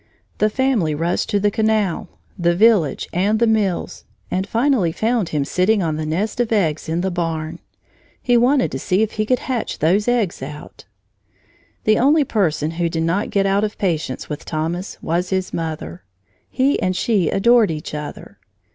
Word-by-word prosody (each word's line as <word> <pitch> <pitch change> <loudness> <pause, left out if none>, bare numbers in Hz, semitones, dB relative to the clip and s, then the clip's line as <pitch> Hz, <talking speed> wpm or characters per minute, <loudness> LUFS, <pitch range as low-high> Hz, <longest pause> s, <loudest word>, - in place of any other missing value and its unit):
The 215 - +3
family 220 - +1
rushed 165 +3 -1
to 205 - +1
the 205 +1 +2
canal, 215 -4 0 0.3
the 175 -2 +1
village, 200 - +3
and 200 +5 +2
the 235 - +3
mills, 215 -5 0 0.3
and 190 +2 -1
finally 230 - +2
found 220 0 0
him 145 -2 -1
sitting 190 +6 +2
on 160 -2 -1
the 155 0 -3
nest 200 +9 -2
of 240 -2 0
eggs 160 -9 0
in 165 +2 0
the 190 +1 -1
barn. 165 -1 -3 0.6
He 245 - +1
wanted 250 +3 +3
to - - -4
see 195 +2 +1
if 220 - -2
he 215 0 -2
could 255 - +3
hatch 250 -2 -3
those 190 +8 +2
eggs 235 - 0
out! 150 +3 -9 1.0
The 215 0 +3
only 295 +4 +4
person 160 - 0
who 170 0 -1
did 165 0 -2
not 175 +5 0
get 195 -1 +1
out 195 +1 +2
of 215 0 -3
patience 160 -8 -2
with 150 0 -6
Thomas 165 +4 -3
was 175 +2 -1
his 190 -1 -2
mother. 155 - -4 0.5
He 270 +2 +1
and 185 0 0
she 195 -5 +1
adored 235 +2 +4
each 155 -2 -5
other. 150 -1 -7
190 Hz, 180 wpm, -20 LUFS, 165-220 Hz, 1.0 s, only